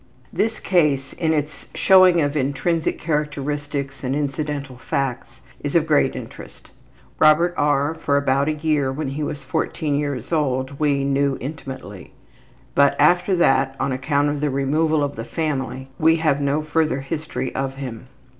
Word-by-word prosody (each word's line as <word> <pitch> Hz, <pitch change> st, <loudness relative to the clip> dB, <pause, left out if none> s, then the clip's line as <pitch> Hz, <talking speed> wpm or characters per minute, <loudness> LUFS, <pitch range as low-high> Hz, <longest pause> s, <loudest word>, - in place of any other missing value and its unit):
This 220 Hz, +1 st, 0 dB
case 145 Hz, -7 st, +1 dB
in 160 Hz, -2 st, 0 dB
its 150 Hz, -1 st, -3 dB
showing 185 Hz, -3 st, +6 dB
of 145 Hz, 0 st, 0 dB
intrinsic 150 Hz, +4 st, 0 dB
characteristics 145 Hz, -2 st, -3 dB
and 130 Hz, +1 st, -1 dB
incidental 145 Hz, -2 st, -3 dB
facts 135 Hz, -5 st, -3 dB, 0.2 s
is 145 Hz, +2 st, -3 dB
of 165 Hz, -2 st, +4 dB
great 145 Hz, -4 st, +2 dB
interest. 125 Hz, -3 st, -10 dB, 0.5 s
Robert 160 Hz, +3 st, +5 dB
R. 145 Hz, +1 st, +1 dB
for 145 Hz, -3 st, 0 dB
about 140 Hz, 0 st, +1 dB
a -, -, +1 dB
year 150 Hz, -3 st, 0 dB
when 140 Hz, +1 st, -3 dB
he 140 Hz, +3 st, -4 dB
was 145 Hz, -1 st, -4 dB
14 145 Hz, +3 st, -2 dB
years 140 Hz, -1 st, -2 dB
old 135 Hz, -2 st, -1 dB
we 145 Hz, -2 st, +1 dB
knew 140 Hz, 0 st, +1 dB
intimately, 130 Hz, -, -8 dB, 0.6 s
but 140 Hz, 0 st, +4 dB
after 175 Hz, +5 st, +4 dB
that 135 Hz, -5 st, +2 dB
on 140 Hz, -, 0 dB
account 140 Hz, +3 st, +1 dB
of 145 Hz, 0 st, -3 dB
the 150 Hz, -, +1 dB
removal 150 Hz, +3 st, +1 dB
of 145 Hz, 0 st, -2 dB
the -, -, -5 dB
family 135 Hz, -4 st, -3 dB
we 160 Hz, +1 st, +5 dB
have 155 Hz, -3 st, +1 dB
no 140 Hz, +2 st, 0 dB
further 155 Hz, -3 st, 0 dB
history 150 Hz, -2 st, -4 dB
of 135 Hz, 0 st, -3 dB
him. 125 Hz, -3 st, -7 dB
145 Hz, 155 wpm, -22 LUFS, 135-155 Hz, 0.6 s, showing